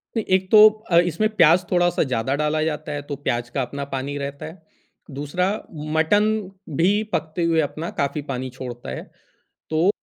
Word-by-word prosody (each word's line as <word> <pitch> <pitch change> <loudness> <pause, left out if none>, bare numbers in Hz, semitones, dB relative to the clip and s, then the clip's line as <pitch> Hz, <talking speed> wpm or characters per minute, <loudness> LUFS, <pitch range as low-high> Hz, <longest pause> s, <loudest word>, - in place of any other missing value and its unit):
नहीं, 225 - -1
एक 185 0 +1
तो 215 0 +10 0.2
अ, 170 - +5
इसमें 175 +5 +1
प्याज़ 170 0 +5
थोड़ा-सा 175 -1 +2
ज़्यादा 130 -1 -1
डाला 150 +1 0
जाता 155 -1 -3
है 145 -1 -3
तो - - -1
प्याज़ 120 0 -1
का 135 - -1
अपना 140 +3 -4
पानी 140 +2 -3
रहता 140 0 -5
है। 160 +2 -10 0.6
दूसरा 165 +6 -1
उ 150 -7 -10
मटन 185 +7 +3 0.5
भी 175 +4 +4 0.2
पकते 160 +2 -1
हुए 165 -1 +2
अपना 155 +3 -4
काफ़ी 140 +1 -1
पानी 130 -1 -3
छोड़ता 125 - -8
है 65 - -5 0.7
तो, 160 +4 +2
155 Hz, 180 wpm, -22 LUFS, 140-175 Hz, 0.7 s, तो